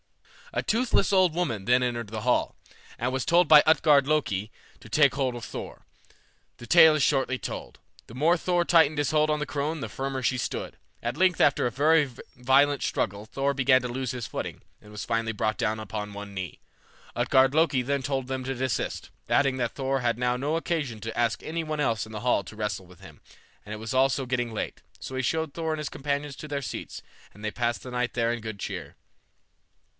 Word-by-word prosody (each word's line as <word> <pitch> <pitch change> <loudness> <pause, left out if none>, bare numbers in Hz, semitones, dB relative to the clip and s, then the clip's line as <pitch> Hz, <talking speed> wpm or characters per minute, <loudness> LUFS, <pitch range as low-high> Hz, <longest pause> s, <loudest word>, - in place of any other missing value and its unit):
A - - -1
toothless 225 -3 +1
old 185 -4 +4
woman 140 - -2
then 125 +4 +3
entered 120 -3 -2
the 110 0 -5
hall, 125 +2 +1 0.4
and 125 +2 -2
was 130 -2 -1
told 170 +4 +4
by 150 -1 +8
Utgard 150 -3 +5
Loki 110 -9 0 0.3
to 115 - -13
take 140 +2 +4
hold 135 -3 0
of 120 - -7
Thor. - - -8 0.7
The 120 - -10
tale 160 -3 +7
is 150 - +1
shortly 135 -2 +1
told. - - -7 0.3
The 115 - -12
more 160 +6 +3
Thor 175 0 0
tightened 160 -4 +4
his 145 0 +1
hold 155 0 +3
on 150 0 +1
the 150 - -2
crone 150 +2 -2
the - - -4
firmer 135 0 -4
she 130 +1 +1
stood. - - -4 0.3
At 120 +1 -3
length 180 0 +2
after 140 -3 +3
a - - -3
very 150 +2 +3 0.3
violent 135 +3 +3
struggle 100 +2 -2
Thor 140 +4 -1
began 130 -1 +4
to - - -2
lose 125 0 -3
his 125 -3 -5
footing, - - -6 0.2
and 105 - -15
was 105 - -6
finally 115 -1 0
brought 110 0 -1
down 110 -2 -1
upon 105 -1 -5
one 100 0 -8
knee. 95 -4 -6 0.6
Utgard 130 +1 +3
Loki 155 -5 +3
then 140 +2 -1
told 135 -1 -2
them 130 -1 -3
to 135 +1 -3
desist, 130 0 -2 0.2
adding 135 -2 +3
that 120 -2 -2
Thor 135 0 -1
had 120 -1 0
now 125 0 +1
no 145 +5 -1
occasion 155 -9 -2
to 115 +2 -6
ask 120 -1 0
any 165 +1 -3
one 155 -1 -4
else 115 -8 0
in 110 - -12
the 105 -1 -6
hall 125 -5 +2
to 100 - -10
wrestle 105 -3 -3
with 90 0 -17
him, 75 -6 -14 0.4
and 105 - -11
it 110 - -4
was 110 +2 -5
also 135 +1 +2
getting 120 -2 -1
late; 110 - -5 0.2
so 130 - -7
he 130 - 0
showed 160 +2 -1
Thor 160 0 -2
and 155 - -1
his 150 - -3
companions 145 0 -3
to 155 - -8
their 140 -2 -3
seats, - - -6 0.3
and 105 +1 -10
they 105 - -1
passed 120 +1 -2
the 125 - -8
night 125 -1 -2
there 115 -1 +1
in 120 - -5
good 110 -2 -6
cheer. - - -6
130 Hz, 220 wpm, -27 LUFS, 115-150 Hz, 0.7 s, by